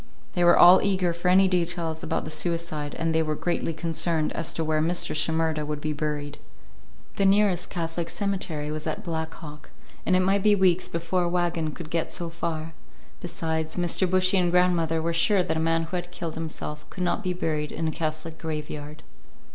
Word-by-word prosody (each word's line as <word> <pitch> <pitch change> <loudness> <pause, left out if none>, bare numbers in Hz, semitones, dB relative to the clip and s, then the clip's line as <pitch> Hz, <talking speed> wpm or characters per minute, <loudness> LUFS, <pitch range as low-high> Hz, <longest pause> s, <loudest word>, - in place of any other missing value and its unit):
They 175 - +1
were 175 - +6
all 180 +2 +8
eager 185 -3 +1
for 170 +2 -3
any 190 +1 +6
details 170 -3 -1
about - - -2
the 155 - -5
suicide, 155 -2 -2
and 165 0 0
they 160 - +3
were 155 -1 -1
greatly 170 +1 -1
concerned 165 0 0
as 165 - -1
to 165 - -2
where 155 0 +1
Mr. 170 +1 +1
Shimerda 160 -1 0
would 150 0 -4
be 155 0 -2
buried. 150 -1 -4 0.8
The 195 - +2
nearest 195 -2 +3
Catholic 165 -1 -3
cemetery 185 -8 -2
was 155 +1 -3
at 160 +7 -3
Black 160 -3 -3
Hawk, 150 -4 -11 0.3
and 185 - +2
it 185 - +4
might 195 +2 +2
be 210 +1 +5
weeks 185 -2 +2
before 170 +2 -1
a - - 0
wagon 170 -2 0
could 165 -3 -9
get 165 -1 -1
so 170 -1 0
far. 165 -1 -4 0.5
Besides, 160 -2 -3
Mr. 175 +1 +1
Bushy 185 +1 +3
and 175 -1 +2
grandmother 170 -2 +2
were 170 0 0
sure 185 +3 +3
that 160 - -1
a - - 0
man 165 0 +1
who 165 +3 -5
had 175 0 -5
killed 170 -2 -5
himself 155 -2 -6
could 185 - -5
not 180 +4 0
be 185 -3 -1
buried 155 -4 -2
in 165 +1 -2
a - - 0
Catholic 155 0 -4
graveyard. 150 -1 -6
165 Hz, 200 wpm, -26 LUFS, 155-180 Hz, 0.8 s, all